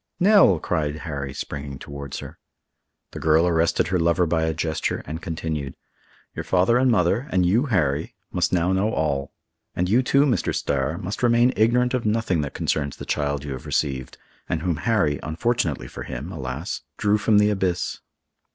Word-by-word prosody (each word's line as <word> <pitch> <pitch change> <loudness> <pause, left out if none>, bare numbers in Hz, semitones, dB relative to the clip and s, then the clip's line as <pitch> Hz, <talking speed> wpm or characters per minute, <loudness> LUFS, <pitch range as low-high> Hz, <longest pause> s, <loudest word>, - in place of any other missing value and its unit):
"Nell!" 195 - +6
cried 75 -2 -1
Harry, 70 -4 -4
springing 70 0 -6
towards 70 0 -7
her. - - -10 0.7
The - - -7
girl 80 +2 +3
arrested 85 0 +2
her 95 -1 +1
lover 85 +2 +2
by 80 -1 +1
a 80 - 0
gesture, 80 -1 -2
and 80 +3 -6
continued, 80 -4 -4 0.6
"Your - - -4
father 95 +7 +3
and 130 0 +3
mother, 105 +4 +2
and 90 -1 +2
you, 115 +11 +2
Harry, 80 - 0 0.2
must - - 0
now 90 0 +2
know 100 +4 +1
all. 70 -6 -1 0.4
And 90 - 0
you 115 +7 +4
too, 140 +2 +3
Mr. 130 -5 0
Starr, 70 +3 -1
must 95 +4 -5
remain 120 +1 +4
ignorant 125 +3 +3
of 125 -2 0
nothing 105 -6 +1
that 70 - -5
concerns 70 -2 -1
the - - -8
child 70 -1 -1
you 75 - -6
have 65 -2 -7
received, 65 -4 -2 0.3
and 80 - -1
whom 85 -4 0
Harry—unfortunately 85 - 0
for - - -9
him, 70 +9 -6
alas!—drew 90 +8 -2
from 105 0 +3
the 105 0 +4
abyss." 90 -3 -1
85 Hz, 170 wpm, -23 LUFS, 75-105 Hz, 0.7 s, Nell